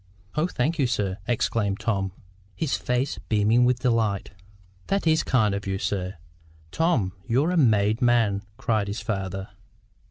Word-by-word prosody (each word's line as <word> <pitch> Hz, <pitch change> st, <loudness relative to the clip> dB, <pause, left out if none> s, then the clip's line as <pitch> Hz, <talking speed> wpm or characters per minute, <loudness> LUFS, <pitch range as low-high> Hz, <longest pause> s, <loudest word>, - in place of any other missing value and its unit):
"Oh, 155 Hz, +3 st, +1 dB
thank 155 Hz, +1 st, -1 dB
you, 135 Hz, -, +3 dB
sir!" 100 Hz, -4 st, -1 dB
exclaimed 105 Hz, -4 st, 0 dB
Tom, 100 Hz, -3 st, -1 dB, 0.4 s
his 155 Hz, -4 st, 0 dB
face 125 Hz, +2 st, -1 dB
beaming 110 Hz, +3 st, +4 dB
with 125 Hz, 0 st, +1 dB
delight. 115 Hz, -5 st, +1 dB, 0.6 s
"That 195 Hz, -2 st, 0 dB
IS 160 Hz, 0 st, +4 dB
kind 110 Hz, -9 st, +2 dB
of 100 Hz, 0 st, -4 dB
you, 95 Hz, 0 st, -1 dB
sir! 95 Hz, -1 st, -2 dB, 0.6 s
Tom, 130 Hz, -, +1 dB
you're 140 Hz, +9 st, +2 dB
a -, -, 0 dB
made 110 Hz, -, +3 dB
man!" 115 Hz, -5 st, +3 dB, 0.2 s
cried 110 Hz, -3 st, 0 dB
the 100 Hz, -, -2 dB
father. 95 Hz, -4 st, -4 dB
115 Hz, 150 wpm, -25 LUFS, 100-125 Hz, 0.6 s, beaming